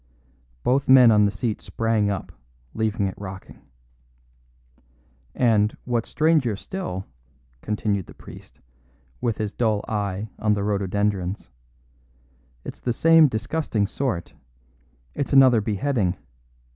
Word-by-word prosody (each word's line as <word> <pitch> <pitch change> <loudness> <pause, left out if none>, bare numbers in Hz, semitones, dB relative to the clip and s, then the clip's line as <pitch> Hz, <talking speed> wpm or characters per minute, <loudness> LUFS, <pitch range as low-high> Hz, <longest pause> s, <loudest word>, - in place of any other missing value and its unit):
Both 130 +2 +1
men 130 -3 +8
on 105 -1 +5
the 100 - +1
seat 105 +3 -3
sprang 115 -2 0
up, 100 - -4 0.4
leaving 110 -2 -1
it 95 - -2
rocking. 95 -1 -9 1.7
"And, 110 -4 +2
what's 120 -2 -1
stranger 155 -8 +2
still," 100 - -6 0.6
continued 105 -3 -2
the - - -13
priest, - - -14 0.6
with 115 -3 -1
his 105 -1 -3
dull 110 -3 0
eye 105 -1 -3
on 105 -1 +2
the 100 - -2
rhododendrons, 100 -2 -2 1.1
"it's - - -8
the 120 - -1
same 165 +4 +6
disgusting 115 -2 -1
sort; 110 -5 -3 0.8
it's 140 - -3
another 130 -4 +6
beheading. 105 -3 -1
110 Hz, 115 wpm, -23 LUFS, 100-125 Hz, 1.7 s, men